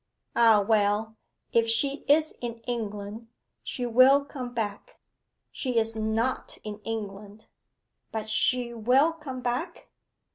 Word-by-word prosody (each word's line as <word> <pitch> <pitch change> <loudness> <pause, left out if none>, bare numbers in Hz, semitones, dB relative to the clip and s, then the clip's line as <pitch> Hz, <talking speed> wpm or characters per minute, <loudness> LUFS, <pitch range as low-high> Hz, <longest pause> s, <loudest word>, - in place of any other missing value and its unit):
Ah, 225 -3 +6
well 215 0 +2 0.4
if 230 0 +3
she 275 +5 +1
is 310 +2 +4
in 235 -1 -4
England, 220 -2 -5 0.3
she 250 - -4
will 255 +4 +5
come 255 -3 -6
back.' 215 -4 -5 0.5
'She 250 -3 -2
is 225 0 +1
not 220 +3 -1
in 210 -1 -6
England.' 210 -1 -6 0.7
'But 220 -1 -4
she 235 +3 +1
will 255 +8 +3
come 275 -6 -7
back? 250 +9 -3
230 Hz, 120 wpm, -27 LUFS, 215-255 Hz, 0.7 s, Ah